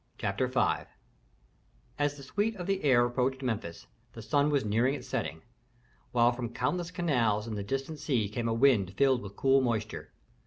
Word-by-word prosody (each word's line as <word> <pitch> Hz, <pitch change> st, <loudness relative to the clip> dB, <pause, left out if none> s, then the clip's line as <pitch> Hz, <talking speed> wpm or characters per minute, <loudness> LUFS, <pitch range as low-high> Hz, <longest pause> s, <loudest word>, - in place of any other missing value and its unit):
CHAPTER -, -, -1 dB
V -, -, -1 dB, 1.4 s
As 145 Hz, 0 st, 0 dB
the 140 Hz, -, -10 dB
suite 210 Hz, +10 st, -1 dB
of 180 Hz, -3 st, -6 dB
the 195 Hz, 0 st, -1 dB
heir 125 Hz, -4 st, +5 dB
approached 130 Hz, +2 st, -1 dB
Memphis, 110 Hz, -9 st, -3 dB, 0.3 s
the 115 Hz, -, -9 dB
sun 145 Hz, +4 st, +2 dB
was 140 Hz, -5 st, +1 dB
near 110 Hz, +4 st, +2 dB
its 140 Hz, +2 st, -3 dB
setting, 80 Hz, 0 st, -3 dB, 0.7 s
while 120 Hz, 0 st, +4 dB
from 120 Hz, -1 st, -4 dB
countless 165 Hz, +9 st, -2 dB
canals 125 Hz, -, +1 dB
and 115 Hz, -2 st, -5 dB
the 100 Hz, -, -3 dB
distant 135 Hz, +8 st, -4 dB
sea 130 Hz, -8 st, 0 dB
came 115 Hz, +3 st, -3 dB
a 115 Hz, -, +1 dB
wind 115 Hz, -7 st, +3 dB
filled 135 Hz, -3 st, +3 dB
with 100 Hz, 0 st, -9 dB
cool 135 Hz, +3 st, +4 dB
moisture. 110 Hz, -4 st, -2 dB
125 Hz, 180 wpm, -30 LUFS, 115-145 Hz, 1.4 s, heir